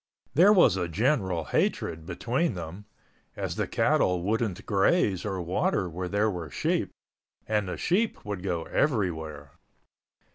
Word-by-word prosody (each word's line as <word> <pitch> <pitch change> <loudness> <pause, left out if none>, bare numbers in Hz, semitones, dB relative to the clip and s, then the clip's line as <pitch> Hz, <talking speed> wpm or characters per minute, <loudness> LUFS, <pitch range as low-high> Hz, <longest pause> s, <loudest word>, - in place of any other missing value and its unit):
There 180 +7 +6
was 175 - +5
a 90 -2 -1
general 95 - 0
hatred 80 +2 -1
between 130 - -1
them, 90 +4 -7 0.5
as - - -3
the - - -1
cattle 90 -1 +2
wouldn't 105 -1 -1
graze 100 - +2
or 95 -3 -2
water 95 - 0
where 90 +2 -4
there 105 +2 +1
were 85 -5 -5
sheep - - -1 0.6
and 105 -2 0
the - - -4
sheep 205 - 0
would 100 -3 -4
go 90 -3 -2
everywhere. 80 - -1
95 Hz, 140 wpm, -27 LUFS, 85-115 Hz, 0.6 s, There